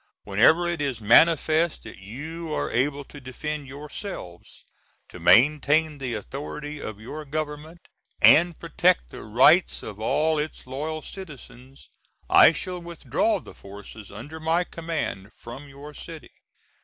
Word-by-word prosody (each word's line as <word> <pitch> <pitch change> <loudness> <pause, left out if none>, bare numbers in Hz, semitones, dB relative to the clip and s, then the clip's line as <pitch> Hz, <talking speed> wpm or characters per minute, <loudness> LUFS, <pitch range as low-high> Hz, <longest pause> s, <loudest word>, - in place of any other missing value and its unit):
Whenever 155 - +4
it 170 -3 -2
is 135 -5 -2
manifest 160 +8 +4
that - - -11
you 155 +11 -7
are - - -2
able 140 +4 0
to 145 +1 -13
defend 145 +3 -5
yourselves, 140 - -9 0.4
to - - -12
maintain 150 +3 +4
the 125 -4 -3
authority 145 +6 -6
of 110 -1 -7
your 150 +8 -7
Government, 155 +2 -6 0.3
and 170 +1 +6
protect - - +1
the - - -9
rights 130 - +4
of 105 -1 -8
all 155 +7 +1
its 150 +1 -5
loyal 155 +5 -5
citizens, 135 - -12 0.4
I - - +8
shall 180 +2 -5
withdraw 170 - -1
the - - -13
forces 100 +1 -12
under 140 +11 -9
my 165 +2 +1
command 160 - -5
from 130 +5 -11
your 140 +2 -11
city. 160 +1 -10
150 Hz, 135 wpm, -25 LUFS, 125-160 Hz, 0.4 s, I